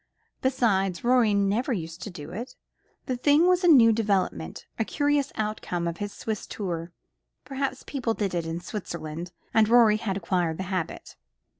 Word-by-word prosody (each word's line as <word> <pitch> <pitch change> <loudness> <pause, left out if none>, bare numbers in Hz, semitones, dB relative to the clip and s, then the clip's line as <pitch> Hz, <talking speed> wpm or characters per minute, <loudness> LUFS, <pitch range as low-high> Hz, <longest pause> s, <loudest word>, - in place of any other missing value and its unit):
Besides, 195 -8 +1
Rorie 240 -4 +4
never 200 +7 +1
used 165 -3 -5
to - - -5
do 165 -4 -9
it. 230 +8 -6 0.5
The 255 - -1
thing 290 +6 +4
was 365 0 +3
a - - +4
new 240 -8 +7
development, 195 - -1
a - - +3
curious 290 +3 0
outcome 210 -5 -2
of 170 - -3
his 205 -1 -4
Swiss 215 -1 -5
tour. 170 -4 -4 0.5
Perhaps 270 -1 -3
people 245 -5 -2
did 200 -3 -2
it 170 -2 -2
in 165 +1 -4
Switzerland, 170 -4 -6 0.2
and 220 -1 +4
Rorie 230 -3 +6
had 200 -3 -2
acquired 170 -3 0
the 190 - -3
habit. 180 -3 -4
210 Hz, 165 wpm, -26 LUFS, 175-245 Hz, 0.5 s, new